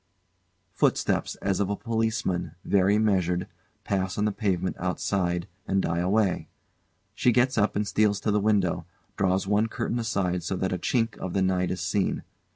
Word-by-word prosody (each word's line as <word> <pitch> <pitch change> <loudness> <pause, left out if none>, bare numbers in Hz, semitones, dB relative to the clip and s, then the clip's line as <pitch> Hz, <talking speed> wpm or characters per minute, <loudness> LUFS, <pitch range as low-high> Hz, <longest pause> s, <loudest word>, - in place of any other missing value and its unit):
] - - -45 0.3
[Footsteps - - +1
as 95 -2 +1
of 100 -1 +1
a 100 - 0
policeman, 110 -7 -1
very 100 +1 +3
measured, 90 -5 +1 0.4
pass 95 -2 -1
on 105 - +1
the 105 - +2
pavement 95 -4 -1
outside, 90 -1 -1 0.2
and 95 - +2
die 85 -2 0
away. 95 +1 +1 0.7
She 125 +3 +3
gets 125 +3 +3
up 105 -1 +2
and 105 0 0
steals 105 -1 +2
to 105 - 0
the 105 - +3
window, 95 -5 +1 0.3
draws 95 0 +1
one 105 +3 +2
curtain 115 +1 -2
aside 95 -6 0
so 95 +3 -2
that 95 0 -1
a 90 - -2
chink 115 +3 0
of 95 - -4
the 95 - +2
night 90 -1 +1
is 90 - -3
seen. 100 -2 0
100 Hz, 175 wpm, -27 LUFS, 90-105 Hz, 0.7 s, very